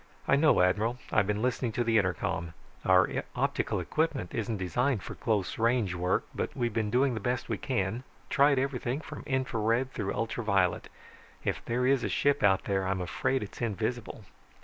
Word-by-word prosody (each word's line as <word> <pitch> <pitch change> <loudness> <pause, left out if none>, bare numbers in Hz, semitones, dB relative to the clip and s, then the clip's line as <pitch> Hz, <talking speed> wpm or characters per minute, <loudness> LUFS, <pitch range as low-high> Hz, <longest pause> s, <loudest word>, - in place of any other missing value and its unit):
"I - - +5
know, 145 - +5
Admiral. 105 +6 +1
I've 110 -3 +3
been 105 +1 -1
listening 125 -2 0
to 120 - 0
the 115 -1 +3
intercom. 85 -3 -2 0.3
Our - - +3
optical - - 0
equipment 155 - -1
isn't 115 -1 -2
designed 115 +6 0
for - - -6
close 105 -4 -1
range 115 -5 +2
work, 90 +1 0
but - - -4
we've 120 -2 0
been 110 -1 0
doing 130 +3 +2
the 110 - -3
best 125 +4 -2
we - - -2
can, 115 -3 -1 0.3
tried 140 -1 +4
everything 130 0 -1
from - - -8
infra 130 -4 -1
red 115 +5 +1
through 100 -3 -2
ultra 115 +1 -2
violet. 100 -4 +1 0.5
If - - -2
there 125 +2 0
is 135 -2 +3
a - - -1
ship 145 0 +2
out 95 -2 +4
there 95 -1 0
I'm 95 0 0
afraid 100 +8 -1
it's 105 - -9
invisible." 115 0 -3
115 Hz, 185 wpm, -29 LUFS, 100-125 Hz, 0.5 s, I